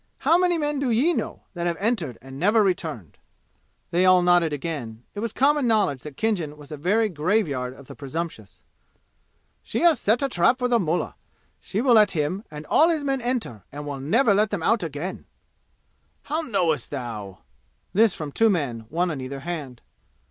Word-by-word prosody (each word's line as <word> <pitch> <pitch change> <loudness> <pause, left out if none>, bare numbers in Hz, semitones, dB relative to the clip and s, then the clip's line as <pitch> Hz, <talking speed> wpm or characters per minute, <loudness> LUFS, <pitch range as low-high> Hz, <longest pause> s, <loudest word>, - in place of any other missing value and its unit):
How 330 - +3
many 355 -1 +3
men 295 -2 -1
do 275 -2 0
ye 260 +10 +3
know - - -4
that 175 -1 -2
have 170 -1 -1
entered 195 - -1
and 135 0 -10
never 210 +4 +4
returned?" 160 - -3 0.7
They 175 +2 +2
all 185 -1 +6
nodded 175 -2 +4
again. 135 -7 -5
It 205 - -6
was 230 0 -2
common 280 +2 +2
knowledge 205 - +2
that 150 -3 -10
Khinjan 175 -10 -1
was 145 -1 -13
a - - -4
very 200 +9 +2
graveyard 150 -8 -1
of 140 - -14
the - - -10
presumptuous. 160 +4 -6 1.0
"She - - -3
has 330 -7 +5
set 225 +6 +2
a - - +2
trap 235 +1 +3
for 250 -1 0
the 240 -1 +3
mullah. 175 -2 -1 0.5
She 205 - -3
will 250 -1 +4
let 210 -3 +5
him 165 +5 -1
and 150 0 -8
all 320 - +4
his 315 -3 0
men 270 -2 -1
enter 235 - -3
and 145 +1 -7
will 140 -2 -5
never 210 - +3
let 210 +2 +2
them 200 -6 -3
out 225 +3 +2
again!" 165 +2 -5 1.0
"How 310 +3 -2
knowest 175 - 0
thou?" 110 -8 -6 0.5
This 220 +1 +4
from 150 -2 -5
two 225 +9 +3
men, 135 - -1
one 175 +2 0
on 140 -4 -5
either 135 +1 -6
hand. 145 -6 -6
175 Hz, 190 wpm, -24 LUFS, 145-225 Hz, 1.0 s, all